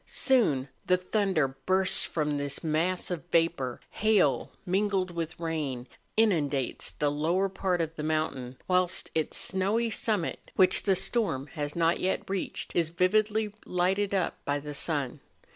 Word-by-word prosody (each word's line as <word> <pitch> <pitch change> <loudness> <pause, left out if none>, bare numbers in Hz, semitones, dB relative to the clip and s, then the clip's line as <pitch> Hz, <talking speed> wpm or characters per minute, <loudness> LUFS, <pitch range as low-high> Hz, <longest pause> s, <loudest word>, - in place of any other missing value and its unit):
Soon 160 - +3 0.2
the 185 - +4
thunder 185 -5 +1 0.2
bursts 190 0 +3
from 150 -2 -1
this 140 +2 -3
mass 165 +4 0
of 170 -5 -3
vapour; 165 -7 +1
hail 195 - +2 0.2
mingled 190 -1 0
with 165 -2 -4
rain 150 -7 -3 0.3
inundates 150 - +1
the 145 -1 -1
lower 165 +6 +1
part 185 -2 -1
of 165 0 -3
the - - -3
mountain, 150 -5 -2
whilst 180 0 +1
its 160 -1 0
snowy 210 +5 +1
summit, 210 -6 -1
which 185 -1 +5
the 195 -2 +2
storm 185 - 0
has 145 -2 -4
not 170 0 +2
yet 190 - -1
reached, 195 -1 -3
is 165 -2 +2
vividly 210 +4 +1
lighted 190 +3 0
up 190 -3 -1
by 145 0 0
the 145 +1 -6
sun. 145 -3 -2
175 Hz, 145 wpm, -28 LUFS, 150-190 Hz, 0.3 s, which